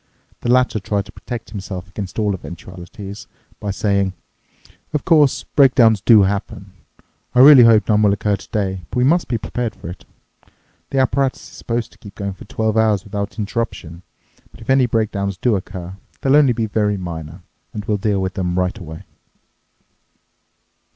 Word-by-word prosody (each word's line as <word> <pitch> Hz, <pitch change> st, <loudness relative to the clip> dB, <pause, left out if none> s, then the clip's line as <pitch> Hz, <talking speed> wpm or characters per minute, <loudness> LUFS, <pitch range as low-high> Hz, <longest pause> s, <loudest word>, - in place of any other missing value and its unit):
The 120 Hz, -, -3 dB
latter 125 Hz, -3 st, +3 dB
tried 100 Hz, 0 st, -2 dB
to -, -, -13 dB
protect 120 Hz, -2 st, -8 dB
himself 95 Hz, -3 st, -6 dB
against 95 Hz, 0 st, -7 dB
all 105 Hz, -2 st, +1 dB
eventualities 95 Hz, +3 st, -9 dB, 0.3 s
by 105 Hz, -, -4 dB
saying, 100 Hz, -1 st, 0 dB, 0.8 s
"Of 150 Hz, -, -2 dB
course, 150 Hz, -5 st, +4 dB
breakdowns 125 Hz, -7 st, +4 dB
do 110 Hz, -2 st, +6 dB
happen. 100 Hz, 0 st, -3 dB, 0.6 s
I 125 Hz, -, +7 dB
really 140 Hz, -1 st, +10 dB
hope 110 Hz, -2 st, +5 dB
none 105 Hz, -1 st, +3 dB
will 105 Hz, -1 st, +4 dB
occur 100 Hz, +1 st, 0 dB
today, 95 Hz, -2 st, -3 dB
but -, -, -5 dB
we 125 Hz, -, +3 dB
must 165 Hz, +6 st, +2 dB
be 120 Hz, -, -1 dB
prepared 115 Hz, 0 st, -4 dB
for -, -, -9 dB
it. 90 Hz, -, -9 dB, 0.9 s
The 135 Hz, -, -3 dB
apparatus 135 Hz, 0 st, +1 dB
is -, -, -15 dB
supposed 115 Hz, -1 st, -3 dB
to -, -, -22 dB
keep 100 Hz, -2 st, -13 dB
going 100 Hz, -1 st, -4 dB
for -, -, -13 dB
twelve 110 Hz, 0 st, -1 dB
hours 110 Hz, -4 st, +2 dB
without 100 Hz, +1 st, -5 dB
interruption. 100 Hz, -6 st, -4 dB, 0.5 s
But -, -, -17 dB
if 115 Hz, -, -2 dB
any 130 Hz, -2 st, +4 dB
breakdowns 100 Hz, -4 st, -1 dB
do 120 Hz, +2 st, +1 dB
occur, 95 Hz, -1 st, -6 dB, 0.2 s
they'll 135 Hz, +1 st, +3 dB
only 145 Hz, -4 st, +5 dB
be 115 Hz, -1 st, -1 dB
very 105 Hz, -1 st, 0 dB
minor, 85 Hz, -1 st, -7 dB, 0.3 s
and 105 Hz, -2 st, -6 dB
we'll 105 Hz, 0 st, 0 dB
deal 100 Hz, 0 st, 0 dB
with 95 Hz, 0 st, -3 dB
them 90 Hz, -3 st, -2 dB
right 90 Hz, +3 st, 0 dB
away." 80 Hz, -3 st, -9 dB
105 Hz, 170 wpm, -19 LUFS, 95-115 Hz, 0.9 s, really